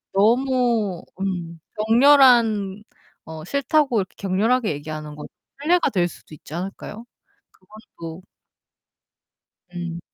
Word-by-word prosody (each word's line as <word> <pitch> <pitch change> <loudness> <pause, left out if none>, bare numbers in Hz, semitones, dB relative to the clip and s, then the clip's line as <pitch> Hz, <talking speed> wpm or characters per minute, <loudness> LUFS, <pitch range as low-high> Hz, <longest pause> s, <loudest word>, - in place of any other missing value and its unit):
너무 235 -3 +2 0.2
음 175 -4 -4 0.3
격렬한 230 -6 +5 0.4
어 160 -1 -8
싫다고 280 - +1
이렇게 190 -1 -4
격렬하게 215 +5 +1
얘기하는 150 +1 -6
건 150 - -8 0.4
실례가 345 +4 +3
될 180 -4 +1
수도 155 -2 -13
있지 150 - -14
않을까요? 195 +5 -6 0.5
그것도 185 -4 -12 1.5
음. 175 -1 -5
200 Hz, 225 characters per minute, -22 LUFS, 175-245 Hz, 1.5 s, 격렬한